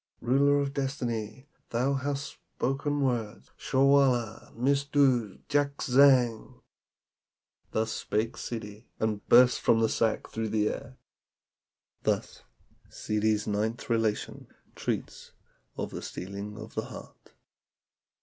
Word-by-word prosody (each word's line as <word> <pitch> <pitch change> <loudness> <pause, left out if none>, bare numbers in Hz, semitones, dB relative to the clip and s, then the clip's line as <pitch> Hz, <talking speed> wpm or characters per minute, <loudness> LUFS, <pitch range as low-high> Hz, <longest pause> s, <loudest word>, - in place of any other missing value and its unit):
"Ruler 140 +3 +3
of 140 -1 -2
Destiny, 130 -3 -3 0.2
thou 125 +4 +1
hast 140 +1 -2 0.3
spoken 145 +2 -1
words! 120 -6 -2
Ssarwala 130 -5 +2
missdood 135 -4 +1
jakzang." 140 -4 +3 1.1
Thus 110 0 -1
spake 110 +2 -2
Ssidi, 110 -1 -7
and 110 -2 -1
burst 125 +1 +6
from 115 - +4
the 110 -1 +2
sack 110 -1 0
through 110 -1 -3
the 105 0 +1
air. 130 +1 -7 1.0
Thus - - -2 0.5
Ssidi's 105 0 0
ninth 110 +3 -2
relation 115 -2 -1 0.3
treats - - -4 0.4
of - - -4
the - - -6
Stealing 100 +3 -7
of 110 0 -9
the - - -3
Heart. - - -12
120 Hz, 105 wpm, -28 LUFS, 110-140 Hz, 1.1 s, burst